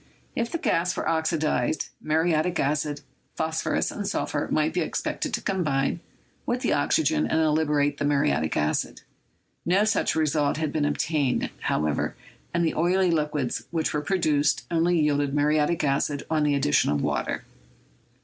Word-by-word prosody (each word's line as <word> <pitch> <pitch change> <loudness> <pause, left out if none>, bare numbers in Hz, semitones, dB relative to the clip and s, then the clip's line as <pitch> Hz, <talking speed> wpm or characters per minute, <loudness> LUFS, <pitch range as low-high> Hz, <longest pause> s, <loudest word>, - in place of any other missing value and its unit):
If 235 0 -1
the - - -1
gas 180 - 0
were - - -2
oxidized, 160 -4 0
mu 155 - -1
riatic 165 +1 +1
acid, 145 +1 -1 0.3
phosphorus 160 0 -1
and 205 -1 -4
sulphur 150 -7 -2
might 155 +1 +1
be 180 - 0
expected - - -2
to - - -5
combine 150 -9 0 0.5
with - - 0
the - - +1
oxygen 75 0 +2
and 160 -1 +2
liberate 145 -2 +1
the 145 - 0
muriatic 80 - +1
acid; 75 0 -1 0.6
no 185 +4 +3
such 215 0 +1
result 150 -2 +1
had 155 -2 -2
been 150 -2 +1
obtained, 145 -2 0
however, 75 -1 -1 0.4
and 170 -1 +1
the 160 - 0
oily 180 +2 +2
liquids 150 -5 -1
which 165 -2 -1
were 150 - 0
produced 150 -3 +1
only 170 +1 +2
yielded 145 -2 +1
muriatic 150 +2 +2
acid 140 0 0
on 155 -1 +2
the 145 -1 +2
addition 135 - +2
of 75 -1 +1
v/ater. - - -1
155 Hz, 155 wpm, -25 LUFS, 145-165 Hz, 0.6 s, no